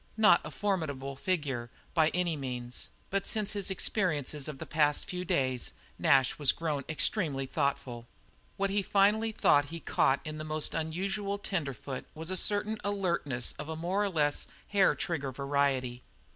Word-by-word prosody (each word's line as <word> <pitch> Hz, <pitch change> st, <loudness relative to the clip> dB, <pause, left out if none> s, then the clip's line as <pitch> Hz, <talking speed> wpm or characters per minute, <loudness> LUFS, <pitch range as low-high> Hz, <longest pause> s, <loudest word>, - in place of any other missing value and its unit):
Not 215 Hz, -1 st, +6 dB
a -, -, -6 dB
formidable 145 Hz, -9 st, -2 dB
figure 140 Hz, -7 st, -1 dB, 0.2 s
by 160 Hz, -2 st, +4 dB
any 175 Hz, -2 st, 0 dB
means, 125 Hz, -3 st, -4 dB, 0.2 s
but 195 Hz, 0 st, 0 dB
since 215 Hz, -3 st, 0 dB
his 200 Hz, -2 st, -2 dB
experiences 155 Hz, -, 0 dB
of 150 Hz, -3 st, -5 dB
the -, -, -6 dB
past 150 Hz, -1 st, +2 dB
few 180 Hz, -2 st, -3 dB
days, 130 Hz, -8 st, 0 dB, 0.3 s
Nash 135 Hz, 0 st, +4 dB
was 145 Hz, -3 st, +5 dB
grown 150 Hz, -4 st, -2 dB
extremely 155 Hz, -4 st, +1 dB
thoughtful. 130 Hz, -4 st, -2 dB, 0.5 s
What 195 Hz, 0 st, +1 dB
he 205 Hz, +1 st, +2 dB
finally 210 Hz, +3 st, +3 dB
thought 145 Hz, -8 st, +4 dB
he 165 Hz, +3 st, -7 dB
caught 135 Hz, -3 st, +2 dB
in 155 Hz, 0 st, -5 dB
this 155 Hz, -, -5 dB
most 155 Hz, 0 st, 0 dB
unusual 195 Hz, +5 st, -2 dB
tenderfoot 140 Hz, -, -3 dB
was 160 Hz, +3 st, -4 dB
a -, -, 0 dB
certain 210 Hz, +3 st, +1 dB
alertness 170 Hz, -11 st, -1 dB
of 150 Hz, -, -5 dB
a 160 Hz, -, -3 dB
more 180 Hz, +6 st, 0 dB
or 205 Hz, -, +1 dB
less 150 Hz, -5 st, +1 dB, 0.2 s
hair 200 Hz, -2 st, +4 dB
trigger 145 Hz, -7 st, -2 dB
variety. 135 Hz, -2 st, 0 dB
155 Hz, 160 wpm, -31 LUFS, 140-195 Hz, 0.5 s, Not